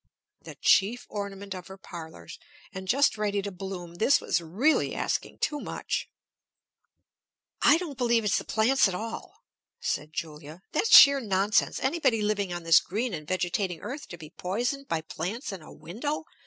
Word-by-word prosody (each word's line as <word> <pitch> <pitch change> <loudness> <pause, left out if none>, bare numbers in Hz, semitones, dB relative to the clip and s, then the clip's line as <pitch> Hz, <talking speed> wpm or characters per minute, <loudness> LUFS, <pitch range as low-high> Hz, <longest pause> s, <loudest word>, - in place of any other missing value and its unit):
The - - -10
chief 215 +5 +3
ornament 200 -1 -5
of 180 -1 -8
her 190 - -10
parlors! 165 -4 -10 0.3
And 190 0 -7
just 270 0 +3
ready 205 -1 0
to 200 - -4
bloom! 180 -2 -7
This 275 +6 +4
was - - 0
really 205 - +1
asking - - -2
too 295 - 0
much. - - -4 1.5
"I - - +6
don't 315 -7 -6
believe 235 -2 +2
it's 205 -3 +2
the - - -7
plants 230 +3 +3
at 190 - -3
all," 225 +4 -7 0.4
said 150 +1 -3
Julia. 155 +1 -7
"That's 430 +9 +7
sheer 280 0 +9
nonsense. 205 -2 +1
Anybody 265 -6 +1
living 205 -3 -1
on 175 -1 -5
this 165 -1 +7
green 220 +4 -3
and 155 -3 -6
vegetating 180 -1 -1
earth 275 +4 -6
to 175 - -9
be 155 -1 -12
poisoned 240 +11 -3
by 165 -1 -1
plants 185 - -5
in 190 -3 -7
a - - -13
window! 225 - -5
200 Hz, 170 wpm, -27 LUFS, 175-240 Hz, 1.5 s, sheer